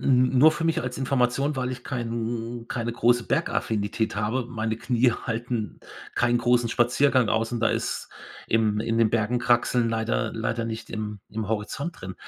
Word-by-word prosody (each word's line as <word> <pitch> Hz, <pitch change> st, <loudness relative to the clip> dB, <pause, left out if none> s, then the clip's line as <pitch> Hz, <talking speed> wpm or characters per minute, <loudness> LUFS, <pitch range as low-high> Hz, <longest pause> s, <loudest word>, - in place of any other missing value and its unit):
n 130 Hz, 0 st, +3 dB
nur 155 Hz, +4 st, +7 dB
für 155 Hz, -, -4 dB
mich 165 Hz, 0 st, +1 dB
als 125 Hz, 0 st, -4 dB
Information, 135 Hz, +2 st, +1 dB
weil 130 Hz, 0 st, -1 dB
ich 125 Hz, -1 st, -8 dB
kein 115 Hz, -1 st, -4 dB
keine 120 Hz, -1 st, -2 dB
große 120 Hz, 0 st, +2 dB
Bergaffinität 110 Hz, -, -1 dB
habe. 110 Hz, +4 st, -1 dB
Meine 110 Hz, -2 st, -2 dB
Knie 120 Hz, +1 st, +2 dB
halten 115 Hz, -2 st, -4 dB, 0.3 s
keinen 120 Hz, 0 st, +2 dB
großen 120 Hz, 0 st, +2 dB
Spaziergang 125 Hz, +1 st, +3 dB
aus 115 Hz, +1 st, +1 dB
und 120 Hz, -, -1 dB
da 115 Hz, -, +3 dB
ist -, -, -2 dB, 0.4 s
im 110 Hz, -2 st, +2 dB
in 115 Hz, 0 st, -1 dB
den 115 Hz, -2 st, +4 dB
Bergen 115 Hz, +2 st, +1 dB
kraxeln 120 Hz, 0 st, +2 dB
leider 110 Hz, -1 st, -1 dB
leider 115 Hz, +1 st, -2 dB
nicht 115 Hz, 0 st, -5 dB
im 105 Hz, -2 st, -4 dB
im 110 Hz, -1 st, -4 dB
Horizont 110 Hz, +10 st, -3 dB
drin. 95 Hz, 0 st, -6 dB
120 Hz, 170 wpm, -25 LUFS, 110-125 Hz, 0.4 s, nur